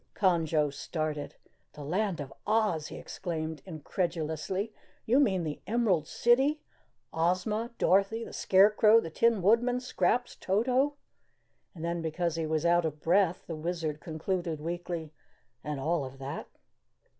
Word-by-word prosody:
Conjo 160 -6 +2
started. 155 -1 -4 0.4
"The 150 - -9
Land 185 +4 -1
of 135 -2 -6
Oz!" 210 -8 +1
he - - -8
exclaimed 160 -4 -5
incredulously. 170 +4 -3 0.3
"You 250 +5 +4
mean 190 -11 +2
the 150 -2 -4
Emerald 200 -8 +1
City 270 +6 +3 0.5
Ozma 185 +7 0
Dorothy 200 +4 +2
the - - -9
Scarecrow 210 +3 +5
the 165 - -5
Tin 225 +2 +2
Woodman 240 +5 +3
Scraps 250 -1 0
Toto 255 +8 +1 0.4
" - - -45
and 165 -1 -5
then 170 0 -1
because 165 +1 -1
he 165 -1 -2
was 155 +1 0
out 175 0 +4
of 155 -2 -3
breath 180 +2 +2
the 165 - -5
Wizard 160 -1 -3
concluded 165 +1 -3
weakly 170 -1 -4 0.5
"and 150 -2 -3
all 160 +2 0
of 135 0 -8
that?" 135 +1 -6
175 Hz, 140 wpm, -30 LUFS, 155-210 Hz, 0.5 s, Scarecrow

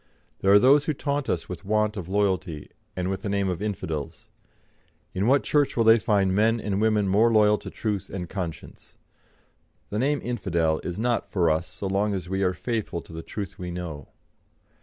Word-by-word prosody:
There 95 - +3
are 100 - +9
those 140 +6 +5
who 155 - -1
taunt 140 0 -2
us - - -1
with 90 +1 -7
want 105 +1 +1
of 95 -4 -6
loyalty, 95 -6 -1 0.2
and 90 0 -2
with 95 0 -3
the 100 - -3
name 100 -1 0
of 90 0 -2
infidels. 80 -8 -4 0.8
In 95 +4 0
what 135 +2 +4
church 145 -4 +1
will 115 - +4
they 115 +1 +6
find 100 -2 +2
men 110 +3 +3
and 100 -2 -2
women 110 -2 +2
more 110 +5 +4
loyal 105 -1 +4
to - - -8
truth 105 -4 -3
and 90 -3 -5
conscience? 85 -5 -7 1.0
The 105 - -1
name 140 +3 +1
infidel 85 -9 0
is 90 - -4
not 120 +2 0
for 85 -4 +2
us 80 +3 -1
so - - -7
long 100 +2 0
as 90 -3 -5
we 95 +1 -2
are 90 -1 +1
faithful 110 -6 -3
to - - -14
the 80 - -5
truth 100 +2 -7
we 90 -1 -5
know. 85 -5 -6
100 Hz, 200 wpm, -25 LUFS, 90-110 Hz, 1.0 s, are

